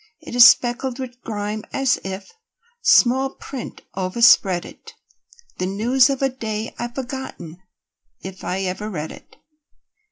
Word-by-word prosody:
It - - -11
is 245 0 +10
speckled 245 +1 +2
with 250 -2 -8
grime 210 0 -4
as 270 -2 +1
if 190 +1 -7 0.5
Small 265 - +4
print 265 -4 -8
overspread 190 -1 +3
it, - - -14 0.6
The 185 - -1
news 245 +7 +3
of 275 0 -2
a 270 - +3
day 220 -3 -5
I've 240 +1 -5
forgotten 255 - -7 0.6
If 190 0 -9
I 185 +2 -2
ever 190 +3 -3
read 160 -6 -5
it. - - -15
230 Hz, 135 wpm, -21 LUFS, 190-255 Hz, 0.6 s, is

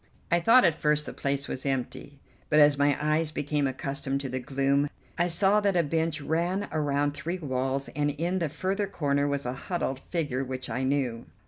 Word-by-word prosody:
I 170 - +4
thought 230 +7 +6
at 170 - +4
first 150 -1 +1
the - - -6
place 140 0 -2
was 130 - -5
empty, 135 +1 -3 0.3
but 150 - +3
as 145 -1 +6
my 145 0 +2
eyes 155 +1 +1
became 145 -1 -1
accustomed 135 +1 -2
to 135 - -4
the 130 +1 -2
gloom 140 +2 +1 0.3
I 175 - +1
saw 195 +4 +3
that 200 -3 +1
a 170 - +4
bench 160 0 -1
ran 175 +7 -1
around 145 -2 +1
three 170 +5 -4
walls 135 -3 -2
and 145 0 +1
in 170 +6 -1
the 165 -3 -1
further 190 +6 -1
corner 145 -6 0
was 140 -1 -1
a 125 - -2
huddled 135 -2 -3
figure 145 -5 -2
which 130 0 -5
I 125 - -2
knew. 130 -4 -1
145 Hz, 200 wpm, -28 LUFS, 135-165 Hz, 0.3 s, thought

